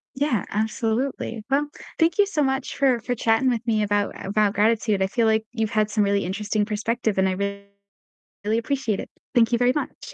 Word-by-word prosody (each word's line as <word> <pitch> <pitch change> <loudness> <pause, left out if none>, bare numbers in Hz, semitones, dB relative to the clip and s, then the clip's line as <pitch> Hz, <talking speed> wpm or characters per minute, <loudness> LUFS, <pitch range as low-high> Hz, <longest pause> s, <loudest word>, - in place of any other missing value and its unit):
Yeah, 265 -8 0
absolutely. 225 +2 -2
Well, 290 +2 +2 0.3
thank 330 +3 +2
you 410 - +5
so 325 -8 0
much 265 -1 -1
for 260 -4 +3
for 245 +2 -3
chatting 225 +3 +2
with 235 -1 -1
me 220 -2 +1
about 205 0 0
about 205 +1 +2
gratitude, 215 -2 +2
I 190 - +3
feel 230 +3 +1
like 220 0 +2
you've 220 -2 -1
had 215 -2 +1
some 210 0 +1
really 200 -1 +1
interesting 205 +2 -1
perspective, 220 0 -1
and 190 0 +3
I - - 0 1.1
really 220 +2 +1
appreciate 235 -4 -1
it. - - -6 0.3
Thank 235 0 +4
you 235 - +3
very 245 +1 +3
much. 405 +10 -5
225 Hz, 195 wpm, -24 LUFS, 210-250 Hz, 1.1 s, you